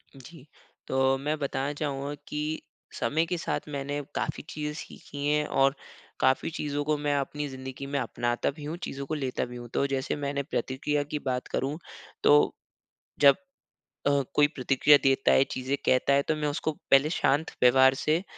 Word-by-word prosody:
जी, 135 +2 -13 0.4
तो 130 0 +2
मैं 150 +3 -2
बताना 140 0 -2
चाहूँगा 145 -1 -3
कि 150 +1 -3 0.4
समय 160 +3 +1
के 175 +1 -2
साथ 160 - -3
मैंने 145 0 -3
काफ़ी 150 - -2
चीज़ें 150 0 -4
सीखी 145 -1 -8
हैं, 150 0 +2
और 135 0 +3 0.4
काफ़ी 130 +4 +2
चीज़ों 145 -3 -2
को 150 +1 +1
मैं 145 0 0
अपनी 145 +1 -2
ज़िंदगी 130 0 -7
में 140 0 -1
अपनाता 120 +1 -1
भी 150 +1 -11
हूँ 155 +3 -4
चीज़ों 140 0 -4
को 155 - -4
लेता 135 -4 -2
भी 125 0 -10
हूँ। 120 0 -8
तो 140 - +2
जैसे 135 -1 -1
मैंने 140 -1 -2
प्रतिक्रिया 145 +2 -1
की 150 +1 -4
बात 125 -1 -1
करूँ 140 +3 -2 0.5
तो 150 0 +5 0.7
जब 140 -1 +8 0.7
अ, 140 0 +3
कोई 145 0 +6
प्रतिक्रिया 145 0 +4
देता 135 0 +3
है 135 - +6
चीज़ें 130 +2 -1
कहता 130 +2 +3
है 140 - +4
तो 155 +2 -1
मैं 150 -1 -1
उसको 150 +2 -1 0.2
पहले 135 +2 +6
शांत 155 -1 +1
व्यवहार 130 +1 +7
से 155 +6 +1
140 Hz, 175 wpm, -28 LUFS, 135-150 Hz, 0.7 s, जब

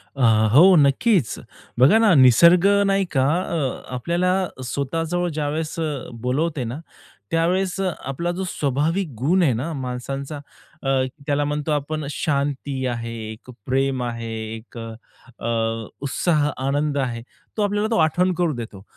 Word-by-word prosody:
अ, 135 - -4 0.3
हो, 180 +7 +8
नक्कीच. 150 - +3 0.4
बघा 135 - +6
ना, 220 -4 +5
निसर्ग 170 +8 +6 0.2
नाही 195 0 +2
का, 130 -2 +2 0.2
अ, 155 -8 -3
आपल्याला 170 +8 0 0.3
स्वतःजवळ 165 +7 -2
ज्यावेळेस, 155 +2 -3
अ, 150 -5 -3
बोलवते 140 +3 -1
ना, 120 +5 -5 0.5
त्यावेळेस 180 +3 +1
आपला 175 -3 -2
जो 190 - -2
स्वाभाविक 155 +5 -1
गुण 160 - +2
आहे 140 -7 +3
ना 130 +9 -3
माणसांचा, 135 +3 -5 0.5
अ, 135 - -1 0.4
त्याला 145 0 +1
म्हणतो 150 +1 -2
आपण 150 +1 -2
शांती 140 -2 -2
आहे, 115 -1 -4 0.2
एक 110 +3 -13 0.2
प्रेम 135 0 0
आहे, 115 -1 -4 0.2
एक, 115 +2 -12
अ, 115 0 -6 0.6
अ, 115 -1 -1
उत्साह, 150 +1 +1 0.2
आनंद 145 +1 0
आहे, 125 -4 -2 0.4
तो - - +1
आपल्याला 205 +1 0
तो - - +2
आठवण 180 +4 +1
करून 175 -4 0
देतो. 110 -5 -8
145 Hz, 140 wpm, -22 LUFS, 130-170 Hz, 0.6 s, हो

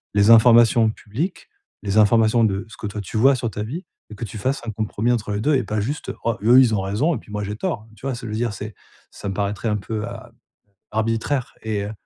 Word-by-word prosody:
les 100 +1 +4
informations 115 0 +6
publiques, 135 - -5 0.3
les 100 0 -1
informations 110 +2 +4
de 95 -2 -1
ce 110 - -13
que 105 - -5
toi 105 +1 -5
tu 100 +3 -5
vois 135 +5 +5
sur 120 -2 -3
ta 105 - -5
vie, 155 - -6 0.2
et 110 - -9
que 110 - -7
tu 110 - -8
fasses 130 +7 -1
un 110 - -3
compromis 110 +2 -1
entre 110 -3 -1
les 100 - -2
2 150 +5 +2
et 130 - +1
pas 105 0 -2
juste 145 +9 -3
«oh 115 -1 0
eux, 120 +3 +6
ils 125 -4 +4
ont 100 - 0
raison 105 - 0
et - - -5
puis - - -16
moi 105 0 -3
j'ai 105 +1 -4
tort 160 - -3
hein» 110 - -21
tu 110 - -12
vois? 135 - -2
Ça 120 - -8
veut - - -5
dire, 115 0 -1
c'est 105 +2 -7 0.4
ça 100 - -6
me - - -3
paraîtrait 100 +2 -2
un 105 - +1
peu 105 +1 -4
a - - -9 0.6
arbitraire 115 +4 -1
et 105 -2 -2
heu, 105 - -5
110 Hz, 260 wpm, -22 LUFS, 105-120 Hz, 0.6 s, informations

